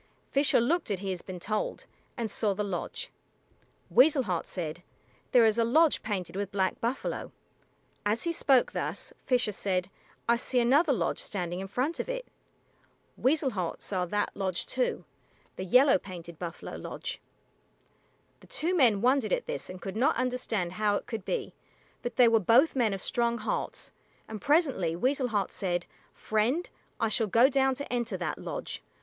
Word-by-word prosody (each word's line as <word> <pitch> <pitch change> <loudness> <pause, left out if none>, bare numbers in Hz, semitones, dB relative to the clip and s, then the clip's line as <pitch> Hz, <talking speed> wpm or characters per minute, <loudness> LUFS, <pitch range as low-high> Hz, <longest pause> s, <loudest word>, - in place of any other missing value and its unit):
Fisher 280 -1 +4
looked 310 +7 +1
as 195 -3 -2
he 195 -1 -2
had 180 -2 -5
been 185 -2 -6
told, 215 +4 -3 0.3
and 230 -3 -2
saw 205 -2 0
the 210 - -1
lodge. 195 -4 -4 0.8
Weasel 275 +1 +5
Heart 180 -7 -2
said, 170 -2 -4 0.5
"There 245 -3 +6
is 220 +1 +3
a - - +5
lodge 305 +7 +4
painted 195 -5 -3
with 200 0 -3
black 190 -1 0
buffalo." 240 +3 -2 0.7
As 210 +2 0
he 335 - 0
spoke 270 -6 +3
thus, - - -4
Fisher 245 -4 +3
said, 185 -2 -1 0.4
"I 235 0 +4
see 250 +1 0
another 280 +7 +4
lodge, 255 - 0
standing 180 -3 -3
in 195 - -5
front 260 - -1
of - - -3
it." - - -3 0.9
Weasel 275 0 +2
Heart 180 -6 -3
saw 185 -3 -2
that 205 +3 -1
lodge 190 -3 -2
too 255 -1 -1 0.5
the - - -5
yellow 250 +4 +5
painted 170 -4 -9
buffalo 170 -2 -6
lodge. - - -6 1.2
The - - -18
two 350 +4 -1
men 235 - +4
wondered 260 +3 +2
at - - 0
this - - -5
and 185 0 -7
could 195 0 -6
not 270 +8 +3
understand 240 -7 -1
how 205 +2 +1
it - - -3
could 225 -4 -5
be, - - -2 0.5
but 240 -1 -4
they 245 - +7
were 230 -1 +5
both 235 - +4
men 225 -6 +2
of 195 - -6
strong 235 0 +1
hearts, 215 - -3 0.4
and 215 -2 -7
presently 275 - +2
Weasel 255 +7 +1
Heart 205 -5 -1
said, 175 -2 -1 0.3
"Friend, 235 +11 0 0.3
I 225 - +2
shall 225 0 +1
go 230 +6 +5
down 270 -1 +2
to 280 -1 -5
enter 235 -5 -1
that 175 -3 -3
lodge. - - -5
225 Hz, 175 wpm, -29 LUFS, 190-260 Hz, 1.2 s, they